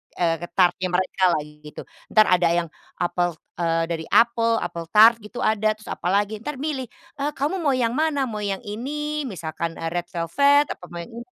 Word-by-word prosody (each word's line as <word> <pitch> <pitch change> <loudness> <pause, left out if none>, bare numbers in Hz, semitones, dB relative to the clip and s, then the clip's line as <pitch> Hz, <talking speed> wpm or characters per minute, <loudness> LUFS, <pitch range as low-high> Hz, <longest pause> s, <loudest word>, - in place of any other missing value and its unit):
eee, 170 0 0
tart-nya 185 0 +3
mereka 185 +1 -1
lah 155 -4 +1
gitu. 150 0 -11 0.2
Entar 215 -1 +5
ada 180 -1 +4
yang 170 -2 -1
dari - - -28
apel 175 0 0 0.3
eee, 165 -1 +1
dari 160 -1 -3
apel, 230 0 +3
apel 170 -1 -5
tart 225 +2 +9
gitu 210 +3 -7
ada, 215 0 +2
terus 215 - -10
apalagi, 205 +4 0
ntar 295 +7 -5
milih, 270 -2 -3 0.3
eee, 290 +2 0
"Kamu 300 +8 -1
mau 285 -5 +1
yang 235 -2 +1
mana, 300 -1 +1
mau 220 -4 -4
yang 200 -2 -3
ini 290 +7 -4
misalkan, 165 -4 -5
eee, 165 0 -4
red 175 0 -3
velvet, 280 - +2
apa 180 - -8
mau 170 0 -7
yang - - -13
ini" 235 - -7
210 Hz, 195 wpm, -23 LUFS, 175-260 Hz, 0.3 s, tart